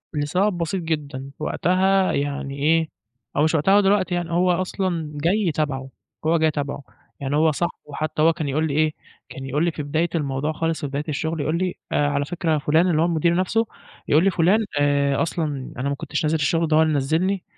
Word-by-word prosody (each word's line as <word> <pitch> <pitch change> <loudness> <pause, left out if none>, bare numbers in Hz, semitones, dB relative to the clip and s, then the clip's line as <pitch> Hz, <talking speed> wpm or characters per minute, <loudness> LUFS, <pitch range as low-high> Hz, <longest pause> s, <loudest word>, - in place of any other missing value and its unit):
لسبب 180 +7 +1
بسيط 170 +2 -2
جدًا، 145 -4 -4
وقتها 190 +2 +2
يعني 140 0 -3
إيه، 160 +2 +2 0.5
هو 150 - +4
مش 160 +1 +2
وقتها 175 +6 +3
هو 205 - +6
دلوقتي 195 -2 +2
يعني، 175 -1 -3
هو 180 +2 +3
أصلًا 175 -3 -2
جاي 175 +5 +1
تبَعُه، 135 -3 -2 0.4
هو 165 +1 +3
جاي 160 0 +2
تبَعُه، 145 -1 -4 0.4
يعني 140 +1 -2
هو 155 +1 +4
صاحبُه، 170 +4 -1 0.2
حتى 155 0 -2
هو 165 +1 +5
كان 155 -2 -4
يقول 155 +3 0
لي 140 - -3
إيه، 155 0 +2 0.4
كان 135 - -8
يقول 145 +5 0
لي 170 - +1
في 155 - -5
بداية 155 +4 0
الموضوع 145 -1 -1
خالص 165 +1 -2
في 145 - -2
بداية 140 +2 -3
الشغل 160 +2 -2
يقول 155 +3 0
لي 185 0 -1 0.2
آآ، 145 - +2
على 145 0 0
فكرة 165 0 -1
فُلان 155 +5 +2
اللي 160 -2 +2
هو 165 - +4
المدير 170 0 +2
نفسُه، 195 +5 +1 0.4
يقول 155 +4 +4
لي: 195 - +4
"فُلان 190 +7 +3
آآ، 140 -1 +2
أصلًا 165 0 -1 0.3
أنا 135 +2 -1
ما 140 - -1
كنتش 160 +1 -3
نازل 155 +1 +1
الشغل 165 +2 +1
ده 155 - +3
هو 160 - +6
اللي 160 -1 +2
نزّلني، 165 +7 0
160 Hz, 210 wpm, -23 LUFS, 145-175 Hz, 0.5 s, هو